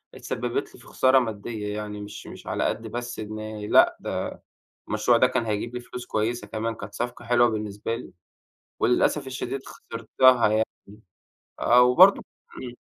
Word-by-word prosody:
اتسبّبت - - -3
لي - - -16
في - - -17
خسارة 130 0 +4
مادية 105 -2 -4
يعني 105 -1 -5
مش 105 - -9
مش - - -11
على - - -1
قد 115 0 -2
بس 120 +1 -5
إن 110 0 -6
لأ، - - +6
ده - - -3 0.6
المشروع 110 +3 +3
ده 125 - +5
كان 125 -2 -1
هيجيب 110 +3 -3
لي 125 - -2
فلوس 125 0 -8
كويسة 115 +2 -2
كمان، 115 +1 -3
كانت 100 0 -9
صفقة 120 0 -5
حلوة 120 0 +4
بالنسبة 105 +1 -3
لي، 120 - -9 0.7
وللأسف 135 +3 +2
الشديد 130 +1 -4
خسرتها 115 +1 +2
يعني 110 +1 +2 1.0
آه، 125 +1 +6
وبرضه 175 +11 +7
ك - - -29 0.4
إمم. 125 -1 -7
115 Hz, 165 wpm, -25 LUFS, 110-125 Hz, 1.0 s, وبرضه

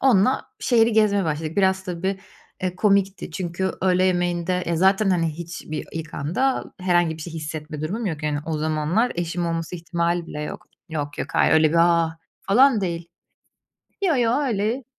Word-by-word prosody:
onunla 255 -1 +3
şehiri 230 -2 +3
gezmeye 205 -2 +3
başladık, 155 +1 -3
biraz 190 -1 +2
tabii, 190 +1 -2 0.4
eee, 180 -1 -2
komikti 195 -2 +1
çünkü 180 +2 -2
öğle 185 0 +3
yemeğinde, 175 0 0
eee, 170 - 0
zaten, 195 +3 +3
hani, 170 -3 +2
hiçbir 165 -2 -6
ilk 160 -1 -6
anda 195 - 0 0.2
herhangi 175 -3 +2
bir 160 - -8
şey 170 - -7
hissetme 155 -1 -6
durumum 200 +9 -3
yok, 160 -4 -3
yani. 150 -1 0
O 160 -2 -2
zamanlar 155 +9 +1
eşim 175 0 -2
olması 165 +1 -3
ihtimali 170 0 -1
bile 150 - -6
yok. - - -7 0.2
Yok, 145 -3 -4
yok, 145 - -3
hayır, - - +4
öyle 155 -1 +5
bir, 165 - 0
ah, 170 -1 +3 0.2
falan 245 +3 +4
değil. 170 -3 -3 1.0
Yo, 320 - +3
yo, 240 +2 +2
öyle 235 -1 -1
175 Hz, 170 wpm, -23 LUFS, 160-195 Hz, 1.0 s, öyle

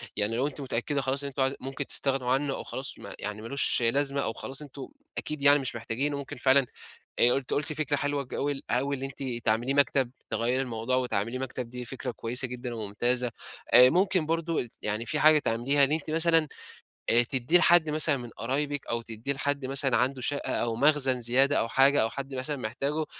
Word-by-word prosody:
يعني 105 +2 -1
لو 130 +4 0
أنتِ 145 0 -7
متأكدة 135 +2 -2
خلاص 135 +1 -2
إن - - -3
أنتم 140 0 -4
عايز 135 +1 +1
ممكن 135 +2 -5
تستغنوا 135 -3 0
عنه 135 +1 0
أو - - -6
خلاص - - 0
ما - - -9
يعني 105 +1 -5
ما 115 - -8
لوش 140 0 0
لازمة 140 +4 +1
أو 115 - -2
خلاص 135 +4 -4
أنتم 140 -2 -9 0.3
أكيد 150 -1 -3
يعني 145 +1 +6
مش 130 -3 -2
محتاجينه 130 +5 -2
ممكن 140 0 -7
فعلًا، 135 +1 +4 0.5
آآ، 120 +2 +4
أنتِ 135 -2 -4
قُلتِ 150 +2 -1
فكرة 150 -1 -1
حلوة 145 0 -1
جول 140 +2 -3
أوي 140 +3 0
إن 135 - -7
أنتِ 135 +1 -6 0.2
تعمليه 120 +5 +1
مكتب، 140 -3 +2 0.2
تغيّري 120 +4 0
الموضوع 120 -1 -2
وتعمليه 125 -1 -1
مكتب 130 -2 -5
دي 125 0 -7
فكرة 130 +1 -5
كويسة 120 +3 -1
جدًا 125 -1 -6
وممتازة. 120 +3 0 0.4
آآ، 125 +1 +9
ممكن 185 0 +2
برضو 165 +1 -1
ال 120 - -4
يعني 105 +2 -2
فيه 150 +6 -1
حاجة 155 0 +6
تعمليها 135 +3 +1
إن 135 - +3
أنتِ 155 0 -1
مثلًا 165 -1 +4 0.6
آآ، 120 +1 +5
تدّيه 130 +6 +2
لحد 175 -2 +5
مثلًا 155 -1 +1
من 120 -2 -8
قرايبِك 140 +5 -3
أو 115 0 -1
تدّيه 115 +4 -4
لحد 140 0 -2
مثلًا 135 -1 +3
عنده 130 +2 0
شقة 145 +3 -1
أو 115 -1 -1
مخزن 135 -1 +3
زيادة 130 +4 +4
أو - - 0
حاجة، 135 +4 +4
أو 110 - +1
حد 135 +2 -7
مثلًا 130 +3 -3
محتاجه، 140 +6 -3
135 Hz, 205 wpm, -27 LUFS, 120-145 Hz, 0.6 s, آآ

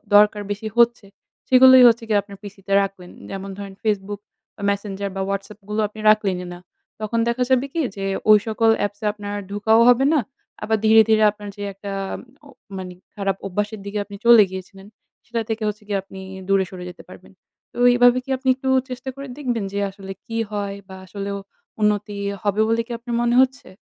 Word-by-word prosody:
দরকার 210 0 +5
বেশি 210 +2 -4
হচ্ছে 235 -3 +3 0.4
সেগুলোই 260 0 +8
হচ্ছে 230 0 +3
গিয়ে 210 -2 +3
আপনার 200 -1 -13
PC 205 0 -9
তে 195 - 0
রাখবেন। 190 -2 -5 0.2
যেমন 195 0 -6
ধরেন 200 -1 -8
Facebook, 205 -1 -2 0.5
Messenger 200 0 -3
বা 195 - -2
WhatsApp 200 +1 -5
গুলো 215 +1 0
আপনি 215 +1 -14
রাখলেনই 195 -4 +2
না। 175 - -10 0.4
তখন 225 +2 -1
দেখা 235 +2 +1
যাবে 260 0 +3
কি 330 - 0
যে 195 0 -4 0.2
ঐ - - +10 0.2
সকল 225 +1 +2 0.2
apps 205 +1 -6
এ - - -2
আপনার 205 -1 -6 0.2
ঢোকাও 220 +2 +3
হবে 245 +2 +4
না। 305 - +4 0.4
আবার 220 0 +1
ধীরে, 220 0 +7
ধীরে, 215 0 +4
আপনার 205 -1 -10
যে 205 - -10
একটা 200 +1 -8 0.5
ও - - -14 0.3
মানে 185 -1 -7 0.2
খারাপ 195 -1 -1
অভ্যাসের 210 +3 -3
দিকে 205 +1 -4
আপনি 205 - -10
চলে 235 -3 +8
গিয়েছিলেন 190 +1 -9 0.4
সেটা 235 -1 -2
থেকে 220 0 -2
হচ্ছে 210 +1 -4
গিয়ে 200 -2 0
আপনি 190 0 -12 0.3
দূরে 195 -1 +3
সরে 180 -1 -9
যেতে 180 - -12
পারবেন। - - -14 0.4
তো - - -13 0.2
এভাবে 245 0 +5
কি - - -16
আপনি 260 0 -1
একটু 265 0 -4 0.2
চেষ্টা 255 +1 -6
করে 275 0 -8
দেখবেন 245 -6 -2
যে 200 - -1
আসলে 195 0 -10
কি 230 0 -5
হয়? 200 -1 -3
বা 190 - -10
আসলেও 200 +1 -5 0.4
উন্নতি 210 -1 0 0.3
হবে 205 +1 +1
বলে 230 +1 +1
কি - - -9
আপনার 240 0 -4
মনে 240 0 +2
হচ্ছে? 260 0 -1
210 Hz, 195 wpm, -22 LUFS, 200-230 Hz, 0.5 s, ঐ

